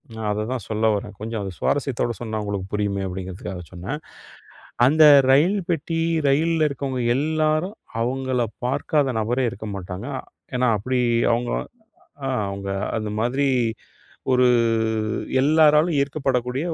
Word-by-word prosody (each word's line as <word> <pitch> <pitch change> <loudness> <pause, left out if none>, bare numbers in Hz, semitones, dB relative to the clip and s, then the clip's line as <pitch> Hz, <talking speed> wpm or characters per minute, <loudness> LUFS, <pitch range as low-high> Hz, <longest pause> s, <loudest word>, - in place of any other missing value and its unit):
நான் 110 -1 -4
அததான் 110 +2 -3
சொல்ல 110 0 0
வரேன். 105 +1 -5
கொஞ்சம் 110 0 -4
அத 95 -1 -4
சுவாரஸ்யத்தோட 135 -4 0
சொன்னா, 110 -2 -3
உங்களுக்கு 100 -2 -3
புரியுமே 100 -1 -1
அப்படிங்கிறதுக்காக 90 0 -6
சொன்னேன். 95 - -5 0.9
அந்த 155 +4 +5 0.3
ரயில் 165 +9 +4
பெட்டி 165 0 -1 0.3
ரயில்ல 155 +3 +3
இருக்கவங்க 135 -2 -3
எல்லாரும், 155 +5 0 0.3
அவங்கள 130 0 0 0.2
பாக்காத 145 +2 +1
நபரே 120 +4 0
இருக்க 110 +1 -8
மாட்டாங்க. 95 +4 -6 0.5
ஏன்னா, 125 0 +2
அப்படி 130 +4 -1 0.3
அவங்க 120 +1 -1 0.7
அ - - -1 0.2
அவங்க 100 0 -5 0.3
அந்த 110 -2 -2
மாதிரி 125 +5 +1 0.9
ஒரு 125 0 +4 1.0
எல்லாராலும் 155 +2 +4
ஈர்க்கப்படக்கூடிய 135 0 -1
125 Hz, 120 wpm, -23 LUFS, 105-145 Hz, 1.0 s, அந்த